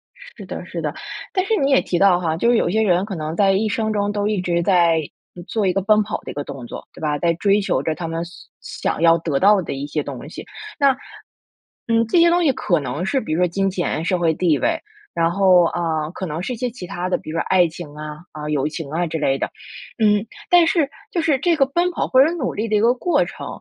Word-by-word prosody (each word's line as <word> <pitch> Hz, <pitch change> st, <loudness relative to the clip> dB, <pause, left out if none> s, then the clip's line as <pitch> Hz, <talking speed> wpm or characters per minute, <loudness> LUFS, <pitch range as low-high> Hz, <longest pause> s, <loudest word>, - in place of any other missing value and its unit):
是 -, -, -13 dB
的 -, -, -7 dB
是 -, -, -5 dB
的， -, -, -2 dB, 0.4 s
但 370 Hz, -2 st, +1 dB
是 445 Hz, -, +1 dB
你 280 Hz, -6 st, +1 dB
也 270 Hz, -, +5 dB
提 175 Hz, -, -2 dB
到 190 Hz, -3 st, +5 dB
哈， 160 Hz, -2 st, -1 dB
就 235 Hz, -, +2 dB
是 240 Hz, -, +4 dB
有 175 Hz, -, +1 dB
一 -, -, -2 dB
些 220 Hz, -, +2 dB
人 185 Hz, -3 st, +2 dB
可 200 Hz, -2 st, -5 dB
能 155 Hz, 0 st, -4 dB
在 195 Hz, +1 st, +4 dB
一 200 Hz, +3 st, +1 dB
生 220 Hz, +1 st, -1 dB
中 205 Hz, -1 st, 0 dB
都 205 Hz, 0 st, -1 dB
一 210 Hz, -3 st, 0 dB
直 175 Hz, -1 st, 0 dB
在 170 Hz, -3 st, +3 dB, 0.5 s
做 220 Hz, -3 st, -1 dB
一 180 Hz, -, +2 dB
个 195 Hz, -, 0 dB
奔 215 Hz, +2 st, +4 dB
跑 210 Hz, -, -3 dB
的 -, -, -6 dB
一 -, -, -8 dB
个 145 Hz, -, -4 dB
动 135 Hz, -3 st, -8 dB
作， -, -, -9 dB
对 -, -, -13 dB
吧？ 150 Hz, -2 st, 0 dB
在 170 Hz, +1 st, +2 dB
追 200 Hz, +4 st, +2 dB
求 190 Hz, -, 0 dB
着 160 Hz, 0 st, -1 dB
他 165 Hz, -, -5 dB
们 165 Hz, +1 st, -3 dB
想 175 Hz, -, -6 dB
想 -, -, -7 dB
要 165 Hz, 0 st, +6 dB
得 160 Hz, -4 st, -1 dB
到 200 Hz, +2 st, +5 dB
的 170 Hz, -, -5 dB
一 140 Hz, +1 st, -4 dB
些 150 Hz, 0 st, -2 dB
东 -, -, -7 dB
西， -, -, -9 dB, 0.3 s
那， 280 Hz, -2 st, +5 dB, 0.9 s
嗯， 230 Hz, 0 st, +2 dB
这 285 Hz, -, +3 dB
些 340 Hz, 0 st, +6 dB
东 350 Hz, +1 st, +2 dB
西 300 Hz, -, +4 dB
可 175 Hz, -8 st, 0 dB
能 145 Hz, +5 st, -4 dB
是 265 Hz, +7 st, 0 dB
比 155 Hz, -, -4 dB
如 160 Hz, -, 0 dB
说 180 Hz, -, +4 dB
金 195 Hz, +3 st, 0 dB
钱、 175 Hz, -4 st, -2 dB
社 180 Hz, +1 st, +1 dB
会 165 Hz, -2 st, +2 dB
地 160 Hz, -2 st, +2 dB
位， 325 Hz, 0 st, 0 dB, 0.3 s
然 165 Hz, 0 st, +1 dB
后， 185 Hz, -1 st, +5 dB
呃， 160 Hz, -2 st, -2 dB
可 190 Hz, -, -5 dB
能 160 Hz, 0 st, -4 dB
是 250 Hz, -, -3 dB
一 -, -, -4 dB
些 250 Hz, +2 st, -2 dB
其 230 Hz, -6 st, -9 dB
它 175 Hz, +2 st, -4 dB
的， -, -, +1 dB
比 -, -, -11 dB
如 165 Hz, -, -3 dB
说 -, -, +1 dB
爱 180 Hz, -2 st, +4 dB
情 165 Hz, -2 st, -9 dB
啊， 150 Hz, 0 st, -7 dB, 0.2 s
啊， 150 Hz, 0 st, -6 dB
友 145 Hz, -2 st, 0 dB
情 155 Hz, -1 st, -6 dB
啊 170 Hz, +2 st, -1 dB
之 165 Hz, 0 st, -3 dB
类 135 Hz, -2 st, +1 dB
的。 -, -, -2 dB, 0.5 s
嗯， 210 Hz, 0 st, +3 dB, 0.2 s
但 350 Hz, -1 st, +6 dB
是 315 Hz, -6 st, +2 dB, 0.2 s
就 340 Hz, -, 0 dB
是 305 Hz, -5 st, +1 dB
这 340 Hz, +4 st, +2 dB
个 280 Hz, -3 st, +3 dB
奔 345 Hz, +6 st, 0 dB
跑 -, -, -2 dB
或 260 Hz, +1 st, +6 dB
者 315 Hz, -, +2 dB
努 300 Hz, -8 st, -2 dB
力 220 Hz, +2 st, -2 dB
的 215 Hz, -, 0 dB
一 205 Hz, -, +3 dB
个 235 Hz, +2 st, +4 dB
过 345 Hz, +7 st, +1 dB
程， -, -, -8 dB
185 Hz, 290 characters per minute, -21 LUFS, 165-230 Hz, 0.9 s, 要